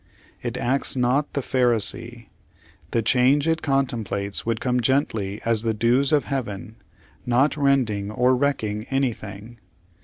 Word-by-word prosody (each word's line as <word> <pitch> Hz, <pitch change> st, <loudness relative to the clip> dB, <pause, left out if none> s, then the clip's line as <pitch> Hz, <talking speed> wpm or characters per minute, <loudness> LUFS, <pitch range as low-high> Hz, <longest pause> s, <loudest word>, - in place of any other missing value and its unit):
It 120 Hz, 0 st, -4 dB
acts 130 Hz, +3 st, 0 dB
not 130 Hz, +4 st, +1 dB
the 140 Hz, -, -1 dB
Pharisee. 120 Hz, -2 st, 0 dB, 0.6 s
The 115 Hz, -, 0 dB
changre 130 Hz, +5 st, +3 dB
it 160 Hz, -, -7 dB
contemplates 115 Hz, -9 st, -1 dB
would 115 Hz, -1 st, 0 dB
come 125 Hz, -1 st, 0 dB
gently 110 Hz, -6 st, 0 dB
as 115 Hz, -2 st, +1 dB
the 110 Hz, -1 st, -1 dB
dews 120 Hz, +5 st, +2 dB
of 150 Hz, -2 st, +3 dB
Heaven, 110 Hz, -4 st, -5 dB, 0.5 s
not 130 Hz, +5 st, +2 dB
rending 130 Hz, -9 st, +1 dB
or 125 Hz, +4 st, +2 dB
wrecking 115 Hz, -6 st, -1 dB
anything. 115 Hz, -4 st, -3 dB
120 Hz, 130 wpm, -23 LUFS, 110-135 Hz, 0.6 s, changre